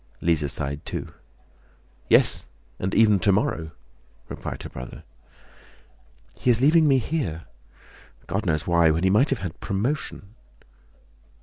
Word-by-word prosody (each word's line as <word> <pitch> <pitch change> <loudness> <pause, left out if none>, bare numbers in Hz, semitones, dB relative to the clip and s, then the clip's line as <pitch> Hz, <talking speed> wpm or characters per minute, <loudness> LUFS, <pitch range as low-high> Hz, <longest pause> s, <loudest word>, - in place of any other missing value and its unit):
Lise 75 -4 +1
sighed 70 +1 -4
too. - - -6 1.0
"Yes, - - +4 0.3
and 95 +1 -2
even 105 -3 +5
tomorrow," 95 -5 +1 0.6
replied - - -6
her - - -7
brother. 65 0 -9 1.4
"He - - 0
is 120 -2 +4
leaving 155 +4 +5
me 135 -2 +4
here, 120 - -3 0.8
God 95 +3 -3
knows 75 -2 0
why, 85 -1 +4
when 80 +3 0
he 95 - +3
might 125 +8 +3
have 135 - 0
had 85 - -7
promotion..." 105 -1 -3
95 Hz, 125 wpm, -24 LUFS, 80-120 Hz, 1.4 s, even